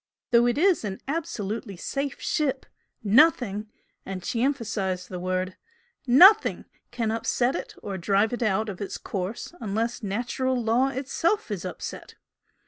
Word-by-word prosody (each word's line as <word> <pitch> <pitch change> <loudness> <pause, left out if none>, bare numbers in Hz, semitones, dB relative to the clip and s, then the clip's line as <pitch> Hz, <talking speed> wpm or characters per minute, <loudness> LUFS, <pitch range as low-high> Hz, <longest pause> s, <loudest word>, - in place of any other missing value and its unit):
Though 240 0 +5
it 240 - +1
is 365 -1 +3
an 195 -2 -4
absolutely 220 - -3
safe 275 +8 -3
ship, 275 -3 -1 0.4
nothing" 220 -3 +3 0.3
and 190 -2 -6
she 235 -3 -1
emphasised 205 -9 -1
the 180 - -5
word 185 +1 -2 0.5
"NOTHING 375 - +6 0.2
can 230 -3 -2
upset 240 +3 0
it - - -6
or 195 -2 -4
drive 200 +5 +2
it 245 - -3
out 215 -1 +1
of 200 -1 -6
its 200 - -4
course 195 - -5
unless 225 +3 -2
natural 245 +5 -1
law 235 +3 +2
is 270 - -5
itself 335 +10 0
upset! - - -7
230 Hz, 140 wpm, -26 LUFS, 195-265 Hz, 0.5 s, NOTHING